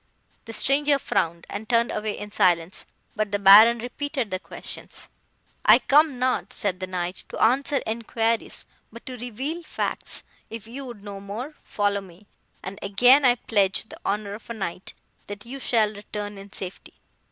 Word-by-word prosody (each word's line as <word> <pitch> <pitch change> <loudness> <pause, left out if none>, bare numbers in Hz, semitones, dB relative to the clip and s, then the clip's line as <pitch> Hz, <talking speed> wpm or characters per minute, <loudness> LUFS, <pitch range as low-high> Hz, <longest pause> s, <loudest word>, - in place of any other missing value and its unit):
"The 225 - -8
stranger 285 +4 +2
frowned, 170 -9 -1
and 210 +2 -7
turned 235 0 +3
away 210 -1 -3
in 210 0 -8
silence; 180 -4 +1 0.3
but 215 -1 -1
the 205 - +1
Baron 210 +4 +8
repeated 250 0 -3
the 185 - -2
questions. - - -8 0.6
"'I - - +9
come 295 -1 +3
not,' 255 +1 0
said 195 -4 -1
the 185 - -4
Knight, 180 0 -4
'to - - -7
answer 270 +4 +2
enquiries, 225 0 -2 0.3
but 235 +1 -12
to 255 - -6
reveal 260 +8 -4
facts. - - -4 0.3
If 225 -2 -8
you 260 +5 -8
would 235 -5 -10
know 200 -1 -7
more, 215 +9 -6
follow 205 -1 0
me, 190 +1 -16 0.4
and 195 +2 -7
again 245 +8 +5
I 245 -2 +5
pledge 200 -5 +1
the - - -13
honour 205 0 -2
of 215 +3 -11
a 235 - -4
Knight 185 -3 -5 0.3
that 205 +1 -8
you 265 +3 -7
shall 220 -4 +2
return 205 0 -7
in 200 0 -12
safety. 185 -2 -8
215 Hz, 170 wpm, -25 LUFS, 200-245 Hz, 0.6 s, I